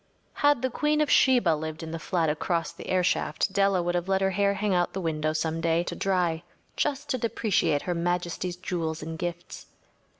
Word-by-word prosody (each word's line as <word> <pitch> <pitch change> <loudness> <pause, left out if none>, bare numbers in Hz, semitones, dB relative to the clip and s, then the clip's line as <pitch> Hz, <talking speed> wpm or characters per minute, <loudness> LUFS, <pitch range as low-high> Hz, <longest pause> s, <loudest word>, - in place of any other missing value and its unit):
Had 290 -4 +2
the 260 - 0
queen 300 +3 +1
of 300 - +1
Sheba 250 -9 +5
lived 155 +1 -3
in 160 - -6
the 165 - -4
flat 170 -1 0
across 165 +2 -1
the - - -10
airshaft, 185 0 +1
Della 195 -2 +2
would 175 0 -1
have 175 0 -1
let 190 0 +1
her 195 0 +2
hair 200 +1 +1
hang 205 0 0
out 175 -1 +1
the 195 - -3
window 155 -3 -1
some 160 +1 -2
day 165 +1 +2
to - - -5
dry 180 -4 0 0.3
just 295 0 -1
to 255 - 0
depreciate 220 -10 +1
Her 180 - -1
Majesty’s 175 +1 -2
jewels 165 -3 -3
and 160 +1 -5
gifts. 175 0 -6
175 Hz, 200 wpm, -27 LUFS, 165-200 Hz, 0.3 s, Sheba